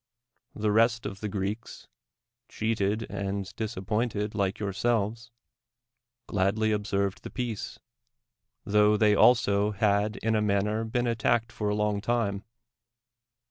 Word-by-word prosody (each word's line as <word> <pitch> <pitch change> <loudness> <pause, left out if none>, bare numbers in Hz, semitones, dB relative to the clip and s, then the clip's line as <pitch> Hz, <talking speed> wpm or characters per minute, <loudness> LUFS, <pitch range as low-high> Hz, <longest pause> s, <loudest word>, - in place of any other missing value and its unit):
The 105 0 0
rest 115 +2 +3
of 100 - -5
the 105 - -4
Greeks, 100 +3 -4 0.6
cheated 110 -1 -1
and 100 0 -4
disappointed 105 0 -2
like 100 -2 -1
your 100 -2 -3
selves, 115 +1 -1 1.0
gladly 105 +3 +1
observed 100 -2 -1
the - - -8
peace, 120 -5 -4 0.9
tho 105 +1 +4
they 105 -1 +4
also 105 -2 +4
had 105 +1 +1
in 110 0 +2
a 110 - +2
manner 105 +2 +1
been 120 +2 -1
attacked 115 0 +1
for 105 -3 -2
a 105 - 0
long 105 -1 0
time. 105 -4 -1
105 Hz, 125 wpm, -28 LUFS, 100-110 Hz, 1.0 s, tho